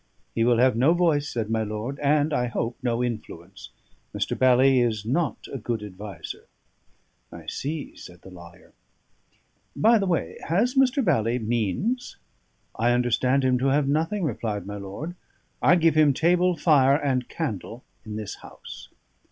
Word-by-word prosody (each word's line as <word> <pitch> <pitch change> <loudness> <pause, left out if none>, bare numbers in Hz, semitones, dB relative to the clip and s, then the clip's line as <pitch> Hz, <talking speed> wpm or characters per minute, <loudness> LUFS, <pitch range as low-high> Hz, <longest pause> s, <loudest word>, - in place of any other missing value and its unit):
"He 115 - +1
will 120 0 +3
have 125 0 +4
no 135 +9 +3
voice," 160 -5 +1
said 115 -2 -3
my 110 0 +1
lord; 110 +6 -4
"and, 150 +1 +2
I 125 -3 +1
hope, 120 0 -3
no 120 -1 0
influence. 100 -6 -7 0.5
Mr. - - -1
Bally 130 +1 +4
is 110 -4 0
not 145 +6 -1
a 135 - -4
good 115 -1 -3
adviser." 100 0 -9 0.8
"I - - -11
see," 145 +1 -5
said 90 -1 -13
the 95 - -12
lawyer. 85 -1 -15 1.0
"By 225 +1 +4
the 195 - -1
way, 170 -2 -2
has 215 +10 +1
Mr. 270 -1 +2
Bally 120 - +1
means?" 120 - -2 0.6
"I 120 +2 +2
understand 125 +2 +1
him 130 -1 +2
to 135 - +1
have 140 +1 +2
nothing," 165 +7 0
replied 110 -7 -3
my 100 +1 -6
lord. 100 - -7 0.5
"I 170 - +5
give 165 -2 +3
him 150 -3 +4
table, 175 +2 +2
fire, 140 -5 +4
and 130 -4 -1
candle 120 - -5 0.2
in 110 -2 -7
this 105 -2 -6
house." - - -12
130 Hz, 160 wpm, -25 LUFS, 110-155 Hz, 1.0 s, I